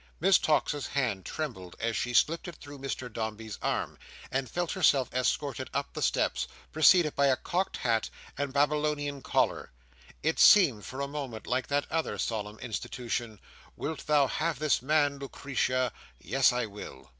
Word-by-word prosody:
Miss 190 +4 +5
Tox's 150 -2 +1
hand 120 -9 -1
trembled 105 - -5
as 115 0 -1
she 125 - -1
slipped 165 +8 +2
it 175 - -7
through 145 -1 -11
Mr 135 -2 -4
Dombey's 110 -1 -5
arm, - - -2 0.3
and 130 -1 -1
felt 175 +4 -2
herself 135 -3 +3
escorted 130 +1 -1
up 140 0 -2
the - - -5
steps, - - +1 0.2
preceded 155 0 +5
by 140 0 +3
a 135 - +4
cocked 180 +7 -2
hat 115 -2 0 0.3
and 140 0 -2
a - - -13
Babylonian 145 0 0
collar. - - 0 0.5
It 160 +1 +1
seemed 140 - +6
for 130 +2 -5
a 140 - -1
moment 140 -6 -6
like 130 +1 -1
that 145 0 0
other 165 0 -1
solemn 105 -1 -3
institution, 120 -2 -4 0.4
"Wilt 155 0 -5
thou 150 -2 +5
have 155 +3 -1
this 150 -2 +1
man, 145 0 +2
Lucretia?" 130 -2 -1 0.3
"Yes, 135 -2 +3
I 125 -1 -1
will." 100 -10 -10
140 Hz, 165 wpm, -29 LUFS, 120-150 Hz, 0.5 s, seemed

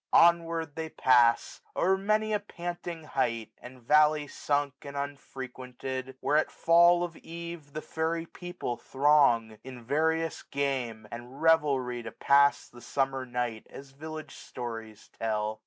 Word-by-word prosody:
Onward 165 -2 +4
they 160 0 -4
pass, 120 -5 +3
o'er 190 +2 +3
many 215 +2 +1
a 210 - +2
panting 175 -3 -6
height, 115 -7 -1
1670 125 +1 -10
And - - -19
valley 150 0 +4
sunk, 145 -2 -1
and 140 0 -8
unfrequented; 130 -2 -6
where 150 - +2
At 155 - +2
fall 175 +1 +5
of 170 -2 -4
eve, 170 -3 -8
the 155 - -5
fairy 165 +1 -2
people 175 -8 -6
throng. 130 -6 +3
In 130 -2 -9
various 160 +5 0
game, 130 -6 -2
and 120 +3 -9
revelry, 140 -7 +2
to - - -7
pass 140 0 +3
The 120 - -15
summer 135 +1 -1
night, 120 -2 -3
as 135 0 -11
village 155 +1 -8
stories 115 -3 -8
tell. 110 -1 -1
140 Hz, 140 wpm, -29 LUFS, 125-160 Hz, -, fall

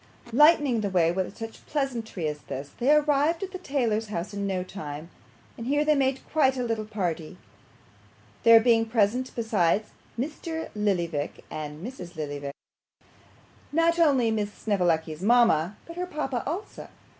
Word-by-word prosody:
Lightening 290 -4 +5
the 205 - -1
way 170 -3 +3
with 190 +2 -3
such 225 0 -8
pleasantry 235 - -2
as 150 -1 -3
this, 140 0 -7
they 255 +4 +3
arrived 300 +3 +3
at 385 - -5
the 370 - -6
tailor's 235 -9 0
house 205 -1 -4
in 200 0 -2
no 185 -2 -1
time; 155 -4 -7 0.5
and 230 - -5
here 290 +2 +2
they 305 - +5
made 270 -2 0
quite 270 -4 +3
a 250 - -1
little 225 -2 -2
party, 180 -5 -3 1.0
there 230 -1 +8
being 225 0 +4
present 230 +3 +1
besides 215 -3 +1 0.3
Mr. 320 +4 -4
Lillyvick 175 -8 -1
and 150 +3 -6
Mrs. 185 -9 -8
Lillyvick, 145 -2 -5 1.2
not 330 +2 +2
only 270 -8 +4
Miss 210 -2 -1
Snevellicci's 170 -7 0
mama, 210 -5 +3
but 335 +1 -10
her 360 0 -2
papa 270 -8 -2
also. 355 +8 -5
225 Hz, 150 wpm, -27 LUFS, 175-275 Hz, 1.2 s, there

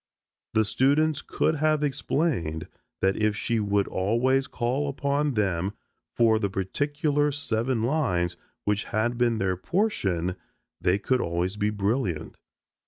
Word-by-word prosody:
The 110 0 +4
students 140 +7 +2
could 155 +2 0
have 155 0 +2
explained 135 - -1 0.3
that 95 0 +3
if 110 -1 +1
she 115 +1 0
would 100 -1 +1
always 125 +8 +1
call 130 +4 -1
upon 140 0 0
them 95 -2 0 0.4
for 115 -2 +4
the 100 -2 0
particular 145 - 0
seven 120 -4 -1
lines 95 - +1 0.3
which 105 0 0
had 120 +3 0
been 120 -1 +2
their 95 -2 0
portion 95 - 0 0.4
they 90 +2 +3
could 125 +5 +1
always 85 +3 -1
be 105 0 0
brilliant. 100 - -1
115 Hz, 130 wpm, -26 LUFS, 95-140 Hz, 0.4 s, The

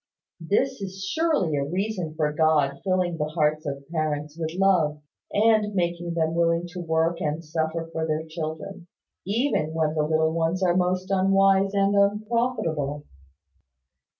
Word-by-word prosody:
This 210 +9 0
is 190 0 -6
surely 300 - +1
a 140 - 0
reason 180 0 -3
for 150 -2 0
God 150 -3 +2
filling 185 -3 0
the 150 0 -1
hearts 155 -1 +1
of 140 0 -5
parents 150 -2 -2
with 160 -1 -3
love, 175 -6 +2 0.3
and 215 -1 +3
making 170 -1 -1
them 160 -1 +1
willing 170 0 +1
to 180 +1 -8
work 165 +1 0
and 155 +1 -2
suffer 160 +1 -2
for 160 0 -2
their 155 0 -1
children, 160 +3 -6 0.4
even 200 - 0
while 155 -1 +1
the 155 - 0
little 160 +1 +1
ones 165 +3 0
are 175 -1 +3
most 185 +1 0
unwise 195 +1 +3
and 200 0 +2
unprofitable. 200 - 0
170 Hz, 150 wpm, -25 LUFS, 155-195 Hz, 0.4 s, and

